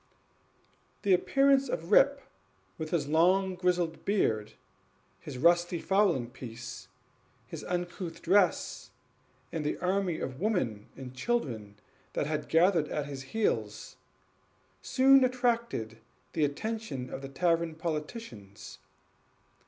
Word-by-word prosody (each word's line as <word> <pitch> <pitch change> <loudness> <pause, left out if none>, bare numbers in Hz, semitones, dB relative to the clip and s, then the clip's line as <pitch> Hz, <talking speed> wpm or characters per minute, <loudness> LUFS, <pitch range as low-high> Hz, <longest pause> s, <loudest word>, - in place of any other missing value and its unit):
The 200 - +4
appearance 275 +7 +3
of 165 -5 -4
Rip, 280 0 +5 0.6
with 155 - -4
his 155 -4 0
long 185 +5 +3
grizzled 180 -2 0
beard, 110 - 0 0.7
his 135 +5 -8
rusty 175 +4 +3
fowling 175 - +1
piece, 120 -2 -8 0.6
his - - -8
uncouth 175 -1 -4
dress, 185 0 +1 0.6
and 160 -2 -3
an - - -1
army 185 -2 0
of 130 0 -5
women 130 - -1
and 130 -1 -9
children 125 - -2 0.4
at 150 +1 0 0.7
his 140 -2 -6
heels, 115 - -2 0.8
soon 270 - +5
attracted 235 - 0 0.3
the 155 - +2
attention 145 - -4
of 135 - -5
the 135 - -7
tavern 165 +2 +1
politicians. 150 - -6
165 Hz, 105 wpm, -30 LUFS, 130-200 Hz, 0.8 s, Rip